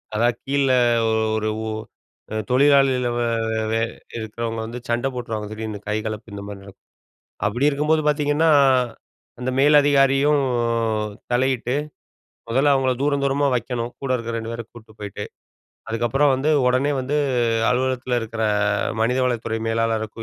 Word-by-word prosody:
அதா 115 +3 +3 0.2
கீழ 140 +1 0 0.7
ஒரு, 110 0 0 0.2
ஒ - - -2 0.8
தொழிலாளில 135 -1 +4
வ - - 0 0.3
வெ 110 - -1
வெ 115 - +1 0.4
இருக்கிறவங்க 115 +1 -4
வந்து 120 +2 -6
சண்ட 120 +3 0
போட்ருவாங்க. 115 -4 -4
திடீர்ன்னு 110 -1 -5
கைகலப்பு 110 0 -3
இந்தமாரி 100 0 -7
நடக்கும். 100 0 -16 0.6
அப்பிடி 135 +4 +1
இருக்கும்போது 150 +2 +1
பார்த்தீங்கன்னா, 150 +2 +2 0.9
அந்த 125 +1 -1
மேலதிகாரியும் 145 0 +4 0.9
தலையிட்டு 125 0 +1 0.7
முதல்ல 135 +5 +3
அவுங்கள 130 -1 +2
தூரம் 140 -1 +1
தூரமா 140 +1 +1
வைக்கணும். 120 0 -3
கூட 135 - -3
இருக்கிற 115 -1 -5
2 115 0 -5
பேர 115 0 -5
கூட்டு 115 -2 -14
போயிட்டு. 100 -2 -6 0.6
அதுக்கப்பறம் 120 +5 +2
வந்து 135 +4 0 0.2
உடனே 130 +3 +2
வந்து 135 +3 -2 0.5
அலுவலகத்தில 125 -1 0
இருக்கிற 115 0 -4 0.6
மனிதவளத்துறை 120 -1 0
மேலாளருக்கோ 115 0 -1
125 Hz, 120 wpm, -22 LUFS, 115-135 Hz, 0.9 s, தொழிலாளில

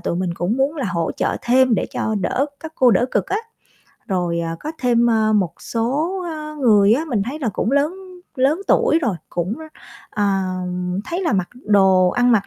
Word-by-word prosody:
tụi 170 - -2
mình 180 -1 -2
cũng 180 +8 -1
muốn 275 +4 0
là 275 - -2
hỗ 170 -2 -1
trợ - - 0
thêm 255 0 +4
để - - -1
cho 220 - -2
đỡ 270 +8 0
các 320 -1 -8
cô 255 -2 +4
đỡ 235 +4 +3
cực - - 0
á. 400 - -1 0.7
Rồi, 175 -3 0
à, 165 0 -3
có 310 - -5
thêm, 240 -1 +3
ơ, 220 -1 +2
một 195 -6 +1
số, 290 +11 -1
ơ, 305 -1 -6
người 210 -4 +5
á 300 +6 -1
mình 225 -8 0
thấy 275 +6 -5
là 265 -7 -1
cũng 220 +4 -2
lớn 285 +5 +2 0.4
lớn 275 +7 +2
tuổi 320 - +4
rồi, 235 -8 +1 0.2
cũng, 175 +4 -2 0.6
ờ, 205 -1 -1 0.8
thấy 345 +3 -3
là 330 - 0
mặc 185 -3 0
đồ 195 -6 +3
ăn 245 0 +3
mặc 205 -4 +2
235 Hz, 200 wpm, -20 LUFS, 195-280 Hz, 0.8 s, người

